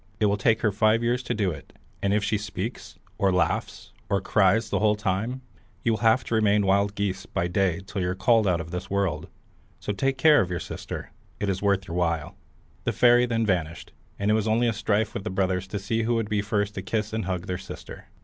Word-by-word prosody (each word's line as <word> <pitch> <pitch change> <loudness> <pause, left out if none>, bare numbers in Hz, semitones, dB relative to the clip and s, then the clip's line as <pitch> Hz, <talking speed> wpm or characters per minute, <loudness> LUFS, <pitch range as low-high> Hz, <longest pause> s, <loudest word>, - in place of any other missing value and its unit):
It 110 - +3
will 100 0 +3
take 110 +2 +2
her 105 - +2
five 110 +3 +2
years 120 +1 +1
to 125 - -3
do 100 -4 +1
it, 70 -4 -10 0.3
and 100 - +1
if 105 0 +2
she 105 +2 0
once 105 - -6
speaks, 100 0 -6 0.2
or 100 -3 +3
laughs, 90 - -1 0.2
or 100 -1 +2
cries 100 +3 +2
the - - +1
whole 105 0 +3
time, 110 +5 -2 0.4
you 115 - +2
will 110 - 0
have 115 +2 +3
to - - -5
remain 105 -2 +3
wild 100 +1 +2
geese 100 -2 -2
by 85 - -1
day 90 -1 0
till 100 0 -4
you're 90 0 -1
called 110 +1 +3
out 90 -2 +2
of 80 0 -7
the 90 +1 -3
world. 100 -3 -1 0.5
So 105 - -3
take 135 +6 0
care 150 +1 +6
of 90 - -2
your 90 -1 -2
sister; - - -7 0.3
it 100 - -1
is 95 -1 -1
worth 100 -2 +1
your 85 - -4
while." 85 -3 -1 0.5
The - - -1
fairy 120 0 +5
then 115 -1 0
vanished, 85 -5 -2 0.3
and 100 +1 +1
it - - +4
was 110 0 +1
only 115 +2 +2
a 115 - +1
strife 105 +1 0
with 100 - -4
the 110 - -3
brothers 95 -1 -1
to 100 - -4
see 105 +3 -1
who 120 +1 +1
would 115 -2 -1
be 105 -1 +1
first 105 -1 -1
to 95 - -4
kiss 105 +3 -2
and 110 -2 -2
hug 90 -1 -3
their 90 -1 -3
sister. - - -10
100 Hz, 240 wpm, -26 LUFS, 95-110 Hz, 0.5 s, care